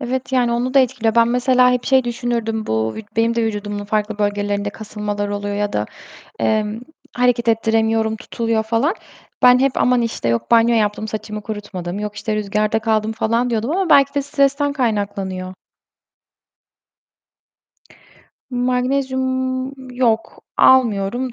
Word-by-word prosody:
Evet, 260 Hz, +1 st, -3 dB
yani, 245 Hz, -2 st, +2 dB
onu 245 Hz, +2 st, -1 dB
da 275 Hz, -, +7 dB
etkiliyor. 240 Hz, -4 st, +1 dB
Ben 230 Hz, 0 st, +4 dB
mesela 250 Hz, +1 st, +3 dB
hep 250 Hz, -1 st, -1 dB
şey 265 Hz, -2 st, +3 dB
düşünürdüm: 235 Hz, -2 st, -2 dB
Bu 110 Hz, 0 st, -1 dB, 0.2 s
benim 230 Hz, +1 st, +2 dB
de 230 Hz, -, 0 dB
vücudumun 205 Hz, -1 st, -3 dB
farklı 210 Hz, 0 st, -2 dB
bölgelerinde 205 Hz, 0 st, -1 dB
kasılmalar 210 Hz, -1 st, -4 dB
oluyor 205 Hz, 0 st, -3 dB
ya 205 Hz, 0 st, -1 dB
da, -, -, -1 dB, 0.5 s
eee, 215 Hz, -1 st, +1 dB, 0.5 s
hareket 245 Hz, -1 st, +1 dB
ettiremiyorum, 225 Hz, 0 st, +1 dB
tutuluyor 225 Hz, 0 st, -2 dB
falan. 235 Hz, -, 0 dB, 0.5 s
Ben 250 Hz, 0 st, +7 dB
hep, 270 Hz, +1 st, +3 dB
"Aman, 250 Hz, -1 st, +3 dB
işte, 225 Hz, -, -2 dB
yok, 115 Hz, 0 st, -1 dB
banyo 235 Hz, 0 st, +5 dB
yaptım, 215 Hz, 0 st, 0 dB
saçımı 215 Hz, 0 st, -5 dB
kurutmadım, 205 Hz, -4 st, -6 dB
yok, 210 Hz, 0 st, -5 dB
işte, 215 Hz, 0 st, -3 dB
rüzgarda 210 Hz, +1 st, 0 dB
kaldım." 220 Hz, -1 st, 0 dB
falan 230 Hz, +2 st, 0 dB
diyordum 230 Hz, +3 st, -1 dB
ama 370 Hz, 0 st, 0 dB
belki 280 Hz, 0 st, +5 dB
de 285 Hz, -, +2 dB
stresten 280 Hz, 0 st, +1 dB
kaynaklanıyor. 200 Hz, -7 st, -2 dB, 3.0 s
Magnezyum, 260 Hz, +1 st, -1 dB
yok 235 Hz, -3 st, 0 dB, 0.2 s
almıyorum 245 Hz, 0 st, +3 dB
225 Hz, 135 wpm, -19 LUFS, 210-250 Hz, 3.0 s, da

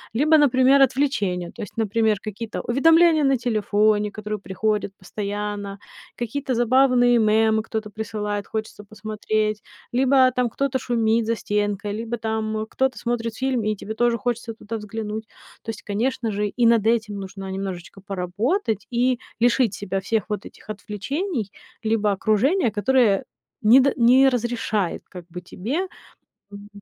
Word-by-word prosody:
Либо, 310 Hz, +5 st, +5 dB
например, 270 Hz, -1 st, +5 dB
отвлечения. 210 Hz, -10 st, +1 dB
То -, -, -10 dB
есть, 205 Hz, -, -8 dB
например, 220 Hz, -1 st, +1 dB
какие-то 215 Hz, +2 st, -5 dB
уведомления 325 Hz, +5 st, +4 dB
на 270 Hz, -1 st, +3 dB
телефоне, 215 Hz, -2 st, +1 dB
которые 210 Hz, 0 st, -5 dB
приходят 205 Hz, +1 st, -1 dB
постоянно, 205 Hz, +1 st, -5 dB, 0.4 s
какие-то 255 Hz, +3 st, -3 dB
забавные 245 Hz, 0 st, +4 dB
мемы 220 Hz, 0 st, +3 dB
кто-то 220 Hz, -1 st, -5 dB
присылает, 210 Hz, -1 st, -4 dB
хочется 215 Hz, -1 st, -5 dB
посмотреть, 215 Hz, 0 st, -2 dB, 0.3 s
либо 260 Hz, 0 st, +4 dB
там 250 Hz, -1 st, 0 dB
кто-то 275 Hz, +2 st, -1 dB
шумит 230 Hz, -2 st, +1 dB
за 230 Hz, -, +1 dB
стенкой, 205 Hz, 0 st, -2 dB
либо 230 Hz, +2 st, -4 dB
там 220 Hz, -1 st, -2 dB
кто-то 265 Hz, -1 st, 0 dB
смотрит 230 Hz, -2 st, -2 dB
фильм, 260 Hz, -3 st, -1 dB
и 215 Hz, 0 st, 0 dB
тебе 210 Hz, +2 st, -6 dB
тоже 235 Hz, +1 st, +1 dB
хочется 240 Hz, 0 st, -3 dB
туда 225 Hz, 0 st, -6 dB
взглянуть. 215 Hz, +1 st, -5 dB, 0.3 s
То -, -, -9 dB
есть, 220 Hz, -2 st, -6 dB
конечно 225 Hz, +2 st, -1 dB
же, 205 Hz, +1 st, -1 dB
и 235 Hz, +4 st, 0 dB
над 230 Hz, -2 st, +4 dB
этим 215 Hz, -3 st, 0 dB
нужно 195 Hz, 0 st, -7 dB, 0.2 s
немножечко 185 Hz, +1 st, -8 dB
поработать 200 Hz, -, -2 dB
и 245 Hz, +1 st, +2 dB, 0.2 s
лишить 240 Hz, -2 st, +3 dB
себя 195 Hz, -1 st, -3 dB
всех 210 Hz, +1 st, -1 dB
вот 210 Hz, -1 st, -3 dB
этих -, -, -14 dB
отвлечений, 215 Hz, -, -4 dB, 0.3 s
либо 220 Hz, -1 st, +1 dB
окружения, 225 Hz, -, +2 dB
которое 210 Hz, -1 st, +2 dB, 0.4 s
не 225 Hz, +5 st, +7 dB
д 270 Hz, +1 st, +3 dB
не 255 Hz, +3 st, +6 dB
разрешает 230 Hz, -6 st, -1 dB
как 180 Hz, -2 st, -10 dB
бы 180 Hz, +1 st, -8 dB
тебе 255 Hz, -, -3 dB, 0.7 s
м 200 Hz, 0 st, -10 dB
220 Hz, 145 wpm, -23 LUFS, 205-245 Hz, 0.7 s, не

